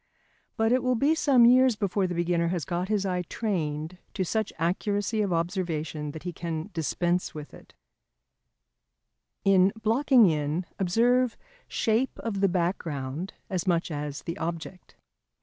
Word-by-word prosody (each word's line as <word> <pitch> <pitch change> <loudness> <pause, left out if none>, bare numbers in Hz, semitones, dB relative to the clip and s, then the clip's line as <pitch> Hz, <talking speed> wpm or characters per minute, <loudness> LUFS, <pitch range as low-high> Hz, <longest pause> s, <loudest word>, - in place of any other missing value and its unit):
But 225 0 +2
it 255 +1 +3
will 255 0 +1
be 280 +7 +3
some 275 -7 +5
years 255 0 +6
before 200 -2 0
the 180 - -4
beginner 170 0 +1
has 175 -2 -2
got 180 +1 -2
his 205 -2 +1
eye 180 -2 0
trained 165 -4 -3 0.2
to 190 - 0
such 220 +3 -1
accuracy 205 +5 0
of 200 -3 0
observation 165 -3 -2
that 155 +2 -8
he 175 -1 -4
can 165 +3 -5
dispense 175 +3 -1
with 150 -1 -8
it. - - -16 1.7
[Sidenote: 195 0 +5
In 190 +2 +5
Blocking 235 +2 +4
in 155 +2 -1
observe 235 +6 +2 0.3
Shape 230 +4 0
of 200 -4 -3
the 195 - +4
Background 170 -3 -2
as 185 -1 -3
much 170 -1 +1
as 145 -1 -4
the 170 - -5
Object. 170 +2 -6
180 Hz, 150 wpm, -27 LUFS, 165-220 Hz, 1.7 s, years